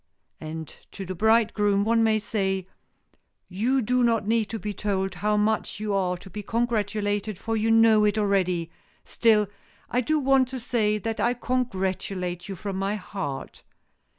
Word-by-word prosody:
And 160 0 -6 0.3
to 195 - -6
the 185 - -4
bridegroom 210 0 +3
one 230 +1 +3
may 220 -1 +3
say,—"You 200 +3 -3
do 250 +3 +1
not 230 -3 +2
need 225 0 +2
to 225 - -5
be 210 -1 -4
told 195 -1 -1
how 210 +4 0
much 215 0 0
you 210 -1 -2
are 180 -2 0
to 185 +2 -13
be 210 - -5
congratulated, 210 -3 -1
for 225 +3 -3
you 220 +1 +1
know 225 -1 +6
it 210 +1 +1
already. 185 -5 +1 0.3
Still 220 -2 +3 0.5
I 250 - +2
do 310 +6 +1
want 270 -2 +3
to 260 +1 -5
say 220 -3 +1
that 225 +2 -4
I 245 +1 +2
congratulate 190 -7 -2
you 195 - -4
from 195 +1 -5
my 195 +2 -1
heart." 185 -9 -6
210 Hz, 160 wpm, -25 LUFS, 195-225 Hz, 0.5 s, know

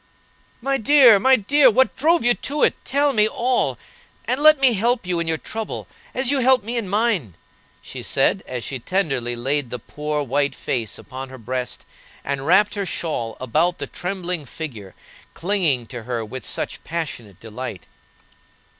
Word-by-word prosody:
"My 270 +2 0
dear, 245 -3 +7
my 265 +6 +5
dear, 260 +5 +4
what 260 +4 +2
drove 330 +3 +3
you 240 - +6
to 285 +8 -2
it? - - +5
Tell 285 +1 +1
me 215 -2 +4
all, 245 +3 0 0.5
and 255 +3 0
let 310 -1 +7
me 265 -3 +4
help 230 +2 0
you 180 -1 -1
in 170 - -2
your 160 -1 0
trouble, 220 +6 -6 0.3
as 260 0 0
you 280 - +2
helped 255 -3 +4
me 235 +2 -4
in 225 -5 -2
mine," 200 - 0 0.5
she - - -8
said, - - +1
as 125 -2 -5
she 130 - -4
tenderly 135 -7 -1
laid 135 +2 -1
the 125 - -4
poor, 150 +4 -3
white 140 +2 0
face 115 -5 -3
upon 130 -1 -8
her 130 - -10
breast, 125 +2 -5 0.4
and 140 0 -3
wrapped 200 +4 +4
her 200 -2 -2
shawl 120 -12 -3
about 155 +8 +1
the - - -4
trembling 180 -4 -4
figure 115 - -8 0.4
clinging 165 - +1
to 120 +1 -8
her 115 -1 -4
with 125 +3 -7
such - - -3
passionate 145 - -5
delight. 110 -6 -7
170 Hz, 170 wpm, -22 LUFS, -, 0.5 s, dear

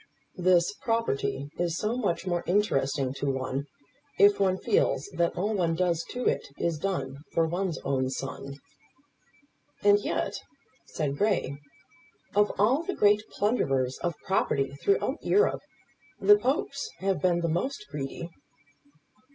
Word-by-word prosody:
"This 180 +1 +3
property 225 - -1
is 170 -1 0
so 215 +5 -1
much 200 -8 -1
more 175 -2 -1
interesting 140 -9 +1
to 140 - -2
one, 130 +1 -2 0.5
if 205 0 +6
one 190 -1 +2
feels 445 - +1
that 170 0 +1
all 205 +5 0
one 170 -5 +1
does 170 -1 +1
to 250 0 -4
it - - 0
is 165 -3 -1
done 140 -8 -2 0.2
for 165 - +3
one's 175 +1 -2
own 130 -1 0
son." 135 +1 -5 1.3
"And 205 0 +6
yet," - - -2 0.5
said 145 -2 -3
Grey, 205 -9 +1 0.8
"of 205 +1 +3
all 240 +9 +3
the 385 +3 -4
great 210 0 +4
plunderers 135 - 0
of 175 -2 -2
property 140 -8 +1
throughout 400 - 0
Europe, 410 - +3 0.6
the 415 - +7
Popes 280 -2 -1
have 190 +1 -1
been 175 -2 +2
the 170 - 0
most 210 - -2
greedy." 145 +4 -5
175 Hz, 135 wpm, -28 LUFS, 140-205 Hz, 1.3 s, the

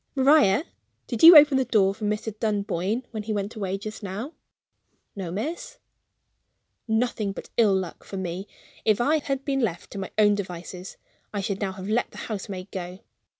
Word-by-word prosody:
"Maria, 275 -4 +5 0.4
did 235 -3 -4
you 330 0 +11
open 290 -2 +7
the 265 - +1
door 200 -5 +3
for 215 +1 -6
Mr. 210 +1 -2
Dunboyne 210 +1 -1
when 220 -3 -4
he 215 +1 -3
went 205 +2 -3
away 195 -3 -2
just 215 +2 -7
now?" 210 - -5 0.8
"No, 185 -4 -5
miss." 315 - -5 1.1
Nothing 220 -3 0
but - - -10
ill 215 -4 +4
luck 185 -3 -5
for 195 - -7
me! 185 +1 -4 0.4
If 215 -2 +2
I 295 +6 +3
had 275 -1 -3
been 275 -1 0
left 180 -9 -2
to 200 - -6
my 190 - -5
own 210 -1 +5
devices, 180 -1 -6 0.3
I 205 - -2
should 195 +1 -3
now 195 -2 -1
have 190 0 -8
let 220 +3 0
the - - -14
housemaid 195 -3 -6
go. 180 0 -6
210 Hz, 180 wpm, -25 LUFS, 190-240 Hz, 1.1 s, you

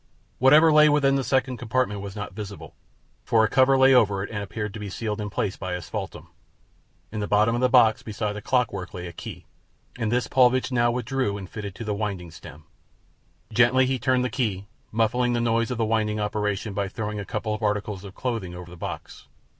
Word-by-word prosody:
Whatever 150 +5 +6
lay 150 0 +7
within 145 -2 +3
the 135 -1 +1
second 130 -1 0
compartment 115 -3 -1
was 100 -1 -7
not 105 -3 -6
visible, 100 -1 -8 0.5
for 110 -1 +3
a - - +4
cover 130 +2 +4
lay 130 0 +6
over 100 -6 +3
it - - -7
and 105 -2 -3
appeared 100 +1 -5
to 110 - -7
be 105 -1 -5
sealed 105 +2 -4
in 105 - -4
place 95 -1 -2
by 95 -2 -4
asphaltum. 90 - -6 0.8
In 110 - -4
the 105 - -2
bottom 105 +2 +3
of 120 - -1
the 125 - +3
box, 110 -2 +5
beside 105 -1 -3
the 105 - -7
clockwork, 105 -8 -1
lay 90 -1 -6
a 85 - -7
key, - - -9 0.5
and 110 -2 -1
this 125 +1 +1
Paulvitch 130 0 +3
now 120 -1 +3
withdrew 125 -3 -1
and 95 -2 -8
fitted 100 -1 -7
to - - -7
the 105 -1 -2
winding 100 -5 -4
stem. 75 -1 -12 0.9
Gently 125 +3 +4
he 130 0 -1
turned 125 +1 +1
the 125 - -2
key, 110 -7 -2 0.3
muffling 120 +3 +1
the 120 - +1
noise 115 0 +1
of 125 - -3
the 115 - +1
winding 110 -1 0
operation 105 0 -2
by 100 0 -1
throwing 105 +1 -4
a - - -4
couple 105 +2 -3
of 105 - -5
articles 105 -2 -2
of 100 -2 -10
clothing 115 -8 -3
over 90 0 -9
the - - -10
box. - - -7
110 Hz, 215 wpm, -25 LUFS, 100-125 Hz, 0.9 s, lay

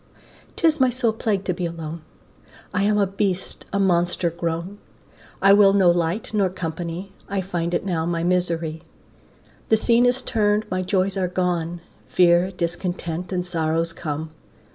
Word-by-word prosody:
'Tis 320 -3 +2
my 260 - +5
sole 240 -2 +1
plague 210 -3 -1
to 180 - -1
be 180 +1 -5
alone, 165 -1 -6 0.7
I 185 - +1
am 210 +1 +2
a 200 - +4
beast, 195 -1 -3
a 200 - 0
monster 175 -2 +1
grown, 170 +4 -4 0.6
I 195 0 +8
will 200 -1 +6
no 190 -3 +5
light 175 +6 -1
nor 200 -3 +2
company, 175 +1 -5 0.2
I 195 0 -1
find 175 -2 -2
it 175 - -2
now 165 -4 -1
my 170 -1 -1
misery. 170 -3 0 0.9
The 220 - +5
scene 235 +2 +4
is 250 +1 +1
turn'd, 210 -2 +1
my 185 0 0
joys 190 +1 0
are 185 -1 +1
gone, 175 -2 -1 0.3
Fear, 175 0 +4
discontent, 175 -1 -3
and 180 -1 -1
sorrows 165 -1 0
come. 155 -1 -5
180 Hz, 160 wpm, -23 LUFS, 170-200 Hz, 0.9 s, I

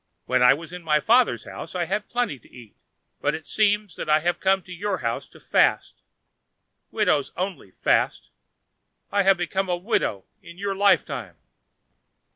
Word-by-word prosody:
When 130 0 +1
I 125 +2 +7
was 165 +3 -10
in 180 - -7
my 155 -2 +2
father's 240 - +3
house - - -9
I 175 -1 0
had 205 +4 -3
plenty 240 - -1
to - - -23
eat, 120 -4 -14 0.5
but - - +1
it 160 - -8
seems 210 -3 +1
that - - -5
I 155 0 +4
have 175 +2 0
come 190 0 +2
to 185 - -14
your 195 +2 -2
house 115 0 -2
to - - -17
fast. - - +1 0.9
Widows 145 - +1
only 185 - -4
fast; - - 0 0.8
I 200 - +3
have 195 0 +4
become 190 +2 -2
a 175 - +1
widow 175 - -1 0.2
in 170 - -13
your 200 0 -2
life 200 -1 +4
time." 120 - -7
180 Hz, 175 wpm, -24 LUFS, 150-200 Hz, 0.9 s, I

